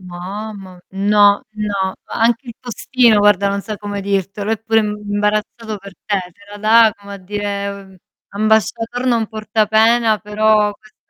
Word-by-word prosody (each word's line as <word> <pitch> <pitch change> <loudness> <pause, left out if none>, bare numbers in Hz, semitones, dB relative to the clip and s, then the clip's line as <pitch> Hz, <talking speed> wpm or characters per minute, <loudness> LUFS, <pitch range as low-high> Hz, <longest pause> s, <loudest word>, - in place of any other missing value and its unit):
Mamma, 190 +1 -8
no. 205 +2 +3
No. 200 -3 -2
Anche 235 +3 0
il 230 - -7
postino, 240 -2 +2
guarda, 205 -1 +4
non 200 0 -1
sa 215 -2 -5
come 205 -1 -5
dirtelo, 200 +1 -2
è 225 - 0
pure 225 +1 +1
imbarazzato 210 +1 -2
per 200 -1 -12
te, 200 -2 0
te 205 - -30
la 205 - -8
dà 220 +1 +5
come 200 0 -10
a - - -7
dire, 200 +1 -4
mhmm, 195 -1 -12 0.3
ambasciator 220 +4 0
non 230 -3 +2
porta 215 0 -1
pena, 220 0 +3
però 210 0 +2
quest'è. 215 +1 -22
210 Hz, 155 wpm, -18 LUFS, 200-220 Hz, 0.3 s, dà